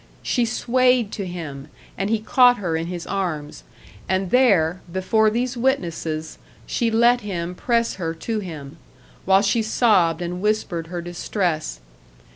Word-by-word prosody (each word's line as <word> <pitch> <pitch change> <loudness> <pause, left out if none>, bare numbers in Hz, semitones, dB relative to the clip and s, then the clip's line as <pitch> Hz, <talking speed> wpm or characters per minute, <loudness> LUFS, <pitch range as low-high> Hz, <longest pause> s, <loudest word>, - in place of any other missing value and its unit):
She 245 - +1
swayed 250 -1 +2
to 200 -3 -4
him, 155 -6 -7 0.3
and 195 +1 -2
he 225 - +2
caught 245 +3 +5
her 175 -5 -2
in 165 +1 -2
his 175 -1 -5
arms 155 - -4 0.5
and 190 0 0
there, 190 -9 +3
before 215 +4 +2
these 245 +3 -1
witnesses, 170 - -2 0.3
she 235 - 0
let 235 +2 +4
him 180 -4 -4
press 235 +3 0
her 165 -1 -2
to 220 +6 -3
him, 160 -6 -8 0.5
while 195 +1 +4
she 225 +3 +2
sobbed 190 -7 +2
and 180 +1 -4
whispered 210 -6 -1
her 175 0 -5
distress. 175 - -2
190 Hz, 145 wpm, -22 LUFS, 170-230 Hz, 0.5 s, caught